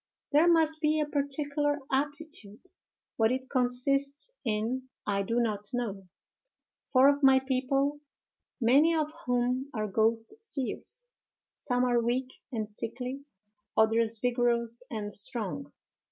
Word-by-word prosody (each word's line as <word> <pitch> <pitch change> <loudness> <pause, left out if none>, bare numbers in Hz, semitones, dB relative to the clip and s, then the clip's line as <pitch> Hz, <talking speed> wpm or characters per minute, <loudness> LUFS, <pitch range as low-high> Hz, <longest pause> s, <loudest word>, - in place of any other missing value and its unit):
There 300 +4 +5
must 320 -1 +3
be 310 0 +2
a 300 - +2
particular 290 0 -1
aptitude; 285 - -3 0.5
what 225 0 +3
it 260 0 -3
consists 275 - +1
in 235 +3 -2 0.2
I 200 -1 0
do 230 +5 0
not 210 -3 -1
know; 205 -6 -3 0.8
for 260 0 +6
of 285 0 +3
my 270 -1 +7
people, 270 +2 0 0.6
many 280 +8 +5
of 310 -1 0 0.2
whom 250 +2 0
are 215 -1 -1
ghost 225 +2 +1
seers, 445 - -3 0.5
some 250 -3 0
are 240 -1 +3
weak 250 +2 -1 0.2
and 220 -4 -2
sickly, 250 +6 -5 0.5
others 225 +1 +3
vigorous 240 0 0
and 210 -2 -4
strong. 225 +5 -1
255 Hz, 125 wpm, -29 LUFS, 230-285 Hz, 0.8 s, my